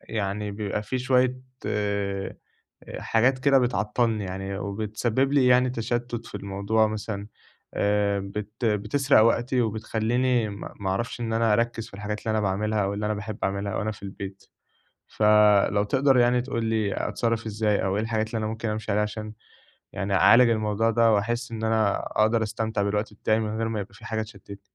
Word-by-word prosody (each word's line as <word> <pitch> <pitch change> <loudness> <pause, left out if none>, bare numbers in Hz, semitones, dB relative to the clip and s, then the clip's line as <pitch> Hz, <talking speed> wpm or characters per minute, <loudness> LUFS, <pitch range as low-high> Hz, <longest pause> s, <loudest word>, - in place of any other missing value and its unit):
يعني 105 -1 -3
بيبقى 105 0 -3
في 130 +4 -3
شوية 130 0 +2 0.3
آآ، 100 -2 -2 0.6
حاجات 125 +4 +2
كده 135 +1 +4
بتعطّلني 115 -2 0
يعني، 95 +1 -5
وبتسبِّب 110 +6 -1
لي 135 -3 +4
يعني 125 0 +4
تشتُّت 120 0 -3
في - - -13
الموضوع 100 +3 0
مثلًا 105 -1 -4 0.5
آآ، 100 0 +1
بت 105 +4 -6
بتسرق 110 +6 +3
وقتي 120 +2 +2
وبتخلّيني 115 +2 0
م 100 -1 -8 0.2
ما 95 -1 -1
أعرفش 115 +5 -3
إن 115 -1 -2
أنا 115 -1 +2
أركّز 115 0 0
في - - -16
الحاجات 105 +1 -4
اللي 110 - -3
أنا 110 0 +1
باعملها، 105 +2 0
أو 100 - -1
اللي 105 +1 -2
أنا 105 - 0
باحب 105 +1 -6
أعملها 100 +1 -2
أو - - -2
أنا 110 - -1
في 100 - -15
البيت، 95 0 -8 0.6
ف - - -4 0.5
لو 100 0 +1
تقدر 135 +5 +3
يعني 120 0 +4
تقول 120 -3 -3
لي 110 -3 0 0.2
أتصرّف 115 -1 -1
إزاي، 105 -1 0
أو 95 0 0
إيه 105 - 0
الحاجات 110 -1 -1
اللي 115 - -4
أنا 110 - -2
ممكن 110 +1 -3
أمشي 110 0 -3
عليها 105 +1 +2
عشان 105 0 -5 0.6
يعني 100 0 -2
أعالج 120 +3 +6
الموضوع 110 0 +1
ده، 115 0 +4
وأحس 120 +4 -1
إن 110 0 -4
أنا 110 -2 +2 0.2
أقدر 110 +1 +2
أستمتع 110 -1 -2
بالوقت 105 +1 -1
بتاعي 110 +1 +1
من 110 0 -3
غير 115 0 -1
ما 110 -2 -2
يبقى 100 0 -8
في 115 +1 -15
حاجة 110 -1 -2
تشتِّتني؟ 100 -2 -11
110 Hz, 185 wpm, -25 LUFS, 100-115 Hz, 0.6 s, أعالج